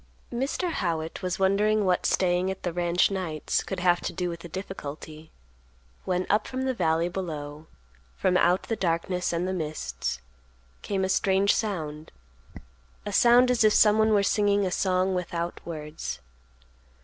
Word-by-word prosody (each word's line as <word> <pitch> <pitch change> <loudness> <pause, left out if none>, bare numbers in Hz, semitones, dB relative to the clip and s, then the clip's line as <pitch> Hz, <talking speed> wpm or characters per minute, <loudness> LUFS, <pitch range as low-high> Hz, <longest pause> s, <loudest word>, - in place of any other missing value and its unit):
Mr. 275 +8 -1
Howitt 165 - -2
was 180 -1 -2
wondering 205 +2 +2
what 180 -1 +2
staying 180 0 +1
at 190 - -5
the 175 - -2
ranch 175 +2 +2
nights 175 -6 -1
could - - -5
have 175 -1 +3
to - - -3
do 180 -1 -2
with 170 -1 -6
the 175 - -10
difficulty, 155 -3 -8 0.8
when, 180 0 0
up 210 - +1
from 260 0 -3
the 260 0 0
valley 165 -6 +1
below, 155 -4 -6 0.5
from 180 - +1
out 180 0 +3
the 225 - -2
darkness 180 0 -1
and 170 +2 -1
the 185 - -2
mists, 65 - -3 0.6
came 195 -2 -1
a - - 0
strange 195 +1 +3
sound; 155 -8 -4 0.9
a - - -3
sound 245 +1 +6
as 240 -3 +2
if 215 -1 +5
someone 220 +1 +5
were 205 -2 +4
singing 205 0 +2
a 185 - -1
song 185 0 +1
without 175 -1 -3
words. 150 - -6
180 Hz, 160 wpm, -26 LUFS, 165-200 Hz, 0.9 s, sound